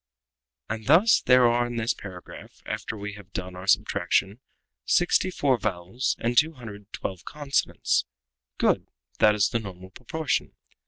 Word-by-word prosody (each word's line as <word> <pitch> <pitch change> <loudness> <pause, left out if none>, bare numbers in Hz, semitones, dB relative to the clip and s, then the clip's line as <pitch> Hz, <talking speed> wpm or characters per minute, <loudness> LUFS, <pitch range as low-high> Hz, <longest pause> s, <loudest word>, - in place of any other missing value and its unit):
"And 110 0 -5
thus 180 - +6
there 125 0 +5
are 120 +1 +2
in 120 - -6
this 115 +1 0
paragraph, 95 -3 -11
after 110 - -4
we 100 0 -6
have 100 -2 -13
done 90 0 -5
our 90 +1 -9
subtraction, 95 +2 +1 0.4
sixty 175 - +2
four 135 -8 +1
vowels 100 +6 -2
and 120 +1 -1
two 160 +6 +4
hundred 120 -7 -9
and 105 0 -22
twelve 95 -2 -5
consonants. 145 -2 0 0.5
Good! - - +1 0.3
that 105 0 +5
is 105 - +2
the 115 - 0
normal 95 -3 -10
proportion. 145 - -2
110 Hz, 155 wpm, -26 LUFS, 95-130 Hz, 0.5 s, thus